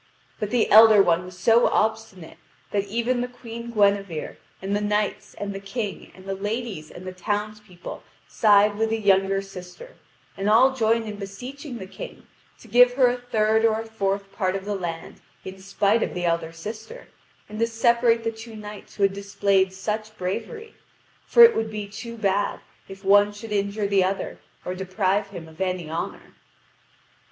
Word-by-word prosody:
But 210 - -2
the 240 -1 +2
elder 220 0 +9
one 175 0 +1
was 180 0 -11
so 230 +5 +4
obstinate 215 -6 -2 0.3
that 200 -1 0
even 235 +4 -1
the 245 - -2
Queen 235 -1 -9
Guinevere 200 -7 0 0.2
and 195 +1 -2
the 205 - 0
knights 210 0 -1
and 205 -1 -5
the 195 - -5
King 200 +1 -5
and 185 - -15
the 195 - -3
ladies 205 -4 -4
and 180 - -11
the 185 - -6
townspeople 210 -1 -5 0.3
side 205 -1 +4
with 225 0 +1
the 225 - 0
younger 195 -1 +2
sister, 195 - -11 0.4
and 195 +2 -1
all 255 +5 +5
join 230 -2 +1
in 210 -2 -6
beseeching 245 +7 -8
the 190 - -7
King 190 - -10 0.4
to - - -15
give 245 +1 +6
her 250 -1 +4
a 250 - -3
third 220 -2 +1
or 220 -1 +3
a - - -9
fourth 200 -3 -2
part 185 -2 -1
of 195 0 -5
the 205 - -2
land 170 -4 -6 0.2
in 190 0 -8
spite 200 +3 +1
of - - -2
the 175 0 -2
elder 165 -1 0
sister, 215 - -9 0.4
and 215 +1 -8
to 230 - +2
separate 230 0 +2
the 225 - -1
two 225 0 -11
knights 210 -1 -10
who 200 - -1
had 195 -1 +3
displayed 200 -1 +1
such 215 +3 -4
bravery, 430 - -5 0.5
for 475 - +8
it 465 - +8
would 225 0 -1
be 210 -1 -5
too 230 +3 -8
bad 200 -1 0 0.3
if 195 0 -12
one 205 +1 +5
should 210 +2 -10
injure 200 +1 -1
the 200 -1 +3
other 190 +1 -3 0.3
or 180 - -3
deprive 190 +2 -1
him 175 -5 -9
of 160 +2 -12
any 180 -4 -2
honour. 165 - -5
205 Hz, 180 wpm, -24 LUFS, 195-225 Hz, 0.5 s, elder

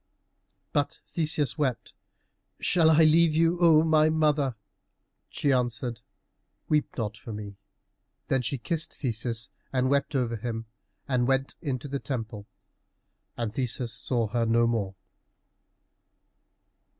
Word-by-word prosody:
But 145 0 0
Theseus 155 -3 -1
wept, 130 -5 -1 0.7
"Shall 165 -3 +3
I 160 0 +6
leave 160 0 +5
you, 165 +2 +3
O 160 -2 +6
my 155 -1 +4
mother?" 150 -5 +2 0.7
She 145 - 0
answered, 120 -2 -1 0.7
"Weep 150 -2 0
not 110 -3 -2
for 115 0 -9
me." 105 -2 -7 0.7
Then 130 - +2
she 125 +3 -2
kissed 165 +6 -2
Theseus 115 -3 -3 0.2
and 130 0 +1
wept 140 +1 +1
over 120 -3 0
him, 115 0 -4 0.4
and 125 -3 +1
went 135 0 +1
into 140 -4 -3
the 140 0 -3
temple, 110 -6 -5 0.9
and 115 -3 -2
Theseus 125 -1 -1
saw 120 -3 0
her 115 +1 0
no 115 +1 +4
more. 105 -5 -1
130 Hz, 125 wpm, -27 LUFS, 115-150 Hz, 0.9 s, I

